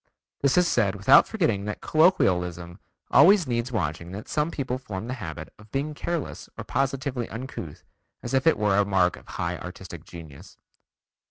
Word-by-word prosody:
This 140 +2 +2
is 180 -1 +5
said 105 - +1
without 100 +1 +6
forgetting 115 - 0
that 105 - -4
colloquialism 90 - +1 0.3
always 195 -1 +6
needs 120 -1 -2
watching 85 -6 -2
and 90 - -8
that 105 - -8
some 150 +1 0
people 130 -5 -3
form 105 -5 -6
the 130 - -3
habit 80 -4 -7
of 110 0 -16
being 145 +3 -2
careless 165 +1 -4
or - - -5
positively 135 -2 -2
uncouth 115 - -7 0.4
as 120 - -5
if 130 +3 +2
it 160 - +5
were 105 -2 +2
a - - +5
mark 95 -3 +2
of - - -16
high - - -3
artistic - - -9
genius." 80 -5 -12
115 Hz, 175 wpm, -25 LUFS, 95-140 Hz, 0.4 s, without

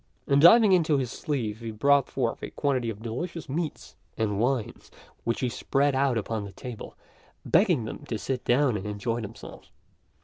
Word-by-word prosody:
And 140 0 +3
diving 210 +5 +8
into 165 -5 +3
his 130 -3 -2
sleeve 115 -8 -3
he 115 -1 -6
brought 140 +5 +3
forth 120 -4 -2
a - - -5
quantity 130 -5 -1
of 110 0 -7
delicious 160 +9 -5
meats 155 +2 -4 0.2
and 105 -2 -1
wines 120 -1 -1 0.4
which 115 - -1
he 130 - +1
spread 140 +3 0
out 135 -2 +2
upon 110 0 -3
the 100 - -8
table, 125 -4 -8 0.5
begging 170 - +3
them - - -6
to 115 - -2
sit 130 +2 -3
down 125 -2 +2
and 100 +1 -6
enjoy 115 +3 -2
themselves. 105 - -10
125 Hz, 175 wpm, -27 LUFS, 115-145 Hz, 0.5 s, diving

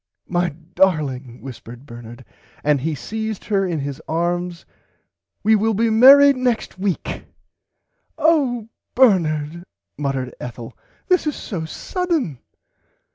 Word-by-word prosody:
My 175 0 0 0.2
Darling 140 -10 0
whispered 125 -1 -10
Bernard 120 -1 -11 0.4
and 145 -2 +2
he 160 +3 -1
seiezed 220 +5 -5
her 195 -2 +2
in 170 -3 -2
his 140 -1 -5
arms 175 +1 -2 0.8
we 220 +1 +5
will 220 +1 +1
be 225 +2 +2
marrid 275 +5 +8
next 245 -6 -1
week. 195 -3 -3 0.9
Oh 265 -9 +2 0.3
Bernard 170 - +2 0.4
muttered 135 -3 -2
Ethel 120 -1 -8 0.3
this 365 -4 +2
is 300 - -1
so 170 -6 -5
sudden. 315 - -2
175 Hz, 115 wpm, -21 LUFS, 140-225 Hz, 0.9 s, marrid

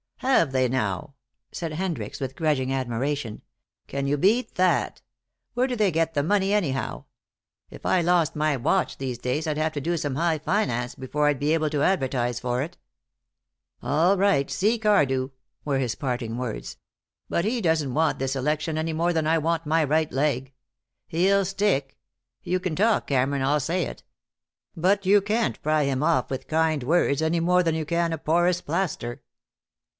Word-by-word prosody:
"Have 255 - +3
they, 130 -1 +2
now," 125 +1 -2 0.4
said 165 -3 -5
Hendricks, 175 0 -4
with 135 -1 -4
grudging 145 -5 0
admiration. 130 -1 -2 0.5
"Can 140 0 -3
you 145 +1 +1
beat 220 - +2
that? 185 -1 +1 0.5
Where 250 +1 +2
do 250 - -2
they 210 -4 +2
get 165 0 0
the 145 - +1
money, 195 +3 +1
anyhow? 150 -11 -1 0.6
If - - -13
I 185 - +3
lost 170 -2 +2
my 155 -1 +1
watch 160 +9 0
these 130 -3 -4
days 130 +6 -2
I'd 155 -1 -1
have 155 0 0
to 145 - -3
do 170 +4 -1
some 145 -4 -2
high 165 +1 +1
finance 125 - -1
before 150 +3 -1
I'd 145 -3 +1
be 150 +2 +1
able 155 -2 +1
to 145 -2 0
advertise 130 -9 0
for 125 +1 -1
it." 170 +4 -8 1.0
"All 165 +7 +2
right, 145 -8 +2
see 220 +5 +1
Cardew," 140 -12 +2 0.4
were 140 -2 0
his 125 -3 -1
parting 120 -4 -3
words. 110 - -5 0.5
"But 170 - 0
he 235 +3 0
doesn't 160 - +1
want 160 +2 +1
this 135 0 -2
election 150 +4 -1
any 160 0 -2
more 170 +2 +1
than 160 -2 0
I 165 +1 +3
want 165 +1 -1
my 160 +1 +3
right 155 +1 +1
leg. 135 -2 0 0.6
He'll 195 +4 +2
stick. 180 -8 0 0.5
You 185 0 0
can 180 -3 -3
talk, 220 +4 +2
Cameron, 135 0 +1
I'll 145 +3 +2
say 170 +5 -1
it. - - -8 0.7
But 195 +4 +1
you 200 +2 +5
can't 215 +3 -1
pry 155 0 +2
him 135 -1 0
off 155 -5 +1
with 130 - -4
kind 160 -3 +1
words, 150 0 +2
any 160 +1 +1
more 180 +2 +3
than 165 -2 0
you 160 -1 -2
can 170 +1 0
a - - -2
porous 175 +3 +2
plaster." 150 -8 -3
155 Hz, 180 wpm, -25 LUFS, 135-175 Hz, 1.0 s, you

